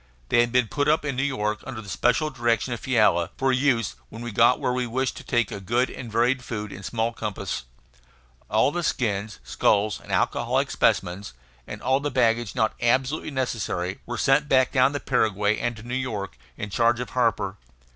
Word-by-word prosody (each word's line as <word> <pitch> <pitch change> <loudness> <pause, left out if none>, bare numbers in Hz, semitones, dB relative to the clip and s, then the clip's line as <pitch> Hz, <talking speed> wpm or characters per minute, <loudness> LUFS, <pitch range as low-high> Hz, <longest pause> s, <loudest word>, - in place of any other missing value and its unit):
They - - +4
had 120 0 +3
been 125 -2 +3
put 145 +5 -1
up 150 0 +2
in 140 -3 -2
New 130 - 0
York 110 -7 -1
under 130 -4 -7
the 110 - -10
special 125 +9 +1
direction 120 -2 0
of 120 - -5
Fiala, 105 -8 +2
for 135 0 +2
use 125 -4 +1 0.2
when 115 +1 -9
we 120 - -5
got 115 +4 +4
where 125 - 0
we 125 -1 -1
wished 130 +2 -1
to - - -9
take 120 -4 0 0.2
good 125 +4 +1
and 120 -4 -8
varied 125 +3 +2
food 105 -4 -5
in 95 - -8
small 115 +3 -2
compass. 105 - -4 0.8
All 110 +6 +3
the 175 - -2
skins, 105 - -1
skulls, 105 0 +1
and - - -11
alcoholic - - +1
specimens, 90 -3 0 0.3
and - - -8
all 130 +1 +2
the 145 +1 -2
baggage 120 -3 +1
not 110 -3 +1
absolutely 130 +6 +1
necessary, 110 -9 -2
were 120 0 -4
sent 140 +5 +2
back 130 -2 +4
down 130 +2 +3
the 145 - -2
Paraguay 105 -5 +1
and 120 0 -1
to 105 - -11
New 120 +1 -6
York, 110 - -3 0.2
in 105 0 -5
charge 115 +2 +2
of 125 -3 -5
Harper. 105 -5 0
120 Hz, 195 wpm, -25 LUFS, 105-130 Hz, 0.8 s, They